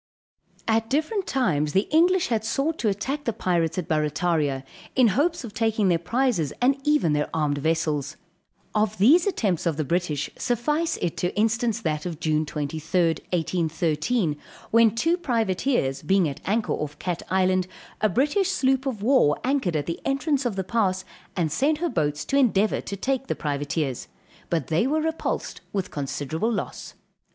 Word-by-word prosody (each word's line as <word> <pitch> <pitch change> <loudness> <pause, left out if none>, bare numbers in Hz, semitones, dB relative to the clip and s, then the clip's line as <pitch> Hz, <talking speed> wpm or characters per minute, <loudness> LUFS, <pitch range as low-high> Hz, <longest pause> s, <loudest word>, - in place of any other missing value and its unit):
At 225 0 +1
different 315 +8 0
times 155 - +1
the 195 +2 +2
English 355 +3 +4
had 225 -3 0
sought 275 +8 -1
to 220 - +2
attack 270 +9 -3
the 230 - +1
pirates 170 -5 0
at 180 - -2
Barrataria, 155 -3 0 0.3
in 255 -3 +5
hopes 300 - +1
of 225 -4 -8
taking 220 -3 +1
their 170 -2 +3
prizes, 205 - 0
and 270 +3 +3
even 295 - +3
their 150 0 0
armed 145 -2 0
vessels. 155 -2 -1 0.6
Of 215 0 +1
these 310 - +5
attempts 200 - 0
of 160 -3 0
the 155 - 0
British, 155 -1 -1
suffice 295 +7 0
it 170 - -1
to 180 - -1
instance 225 +1 +1
that 155 -1 -2
of 165 -3 -6
June 155 -2 0
23d, 160 +3 0
1813, 165 +1 0 0.3
when 230 -1 +5
two 330 +9 +2
privateers 225 - 0
being 190 +2 +2
at 140 - -6
anchor 215 +3 0
off 150 0 -4
Cat 175 0 -3
Island, 185 -1 +2 0.3
a 215 - +3
British 300 - +1
sloop 265 -5 +1
of 220 -6 -3
war 240 - +4
anchored 255 - 0
at 145 -2 0
the 170 +1 -4
entrance 275 -1 0
of 220 - -3
the 190 - -1
pass, 190 -2 0 0.3
and 165 -4 0
sent 290 - +2
her 345 +2 -1
boats 150 - -1
to 275 - +1
endeavor 215 -6 +3
to 200 - -6
take 265 +5 -1
the - - -1
privateers; 145 -2 -2 0.4
but 165 -5 0
they 165 +9 +1
were 310 +3 +1
repulsed 320 +1 -3
with 195 -2 -3
considerable 145 - -2
loss. 215 - -5
195 Hz, 170 wpm, -25 LUFS, 160-260 Hz, 0.6 s, in